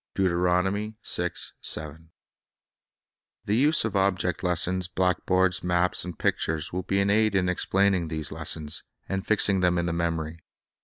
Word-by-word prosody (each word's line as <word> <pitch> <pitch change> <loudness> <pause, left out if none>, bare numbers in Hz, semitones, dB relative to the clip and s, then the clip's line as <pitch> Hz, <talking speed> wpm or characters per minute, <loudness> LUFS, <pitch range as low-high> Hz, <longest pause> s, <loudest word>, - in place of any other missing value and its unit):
1 95 +3 +1 2.5
The 105 - +1
use 145 +5 +3
of 110 - -3
object 90 -3 +1
lessons, 90 +1 0
blackboards, 90 +1 +1
maps, 90 0 +1
and 90 -2 -7
pictures, 80 0 -1
will 90 - -1
be 95 +2 0
an 100 0 +2
aid 110 -1 +3
in 95 -1 +2
explaining 95 -1 +1
these 80 -2 -2
lessons, 80 -1 -2 0.3
Object - - -12
ant 95 0 -1
j - - -25
fixing 100 -2 +3
them 90 -1 +2
in 85 - 0
the 85 - -1
memory. 85 -1 -2
90 Hz, 145 wpm, -26 LUFS, 85-95 Hz, 2.5 s, use